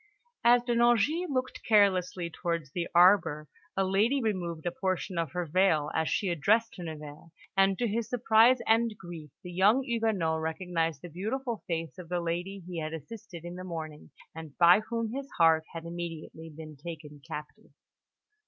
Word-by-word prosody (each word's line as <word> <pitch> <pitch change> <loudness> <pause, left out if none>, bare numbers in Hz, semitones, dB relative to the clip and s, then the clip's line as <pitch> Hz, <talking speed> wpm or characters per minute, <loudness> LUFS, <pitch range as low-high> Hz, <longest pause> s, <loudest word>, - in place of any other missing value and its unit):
As 240 0 +6
De 240 -1 0
Nangis 240 - +3
looked 260 -2 -2
carelessly 185 -5 +3
towards 170 -5 -3
the 170 +2 -2
arbour, 170 -4 +5 0.3
the 195 - +2
lady 205 +8 +2
removed 180 -8 -2
a 175 - 0
portion 185 0 -2
of 165 -5 -2
her 180 -1 -2
veil 160 -3 +2
as 160 0 0
she 200 - 0
addressed 210 +8 +2
De 180 - -10
Nevers; 155 -1 -8 0.3
and 195 0 +3
to 240 - 0
his 225 +1 -2
surprise 235 +1 +5
and 225 -1 +2
grief, 170 -4 -9
the 180 - -7
young 205 +9 +4
Huguenot 220 - 0
recognised 165 -2 -2
the - - -6
beautiful 225 - -4
face 165 +1 -3
of 170 -2 -10
the 180 0 0
lady 175 +3 -3
he 175 -2 -5
had 155 0 -4
assisted 170 +1 -10
in 175 - -6
the 180 +1 -7
morning, 160 -4 -7 0.2
and 160 -3 -10
by 175 +3 +7
whom 230 -1 -2
his 275 +1 -5
heart 160 -1 +5
had 165 0 -7
immediately 165 -1 -7
been 155 0 -10
taken 150 -1 -9
captive. 150 0 -8
180 Hz, 170 wpm, -29 LUFS, 160-220 Hz, 0.3 s, by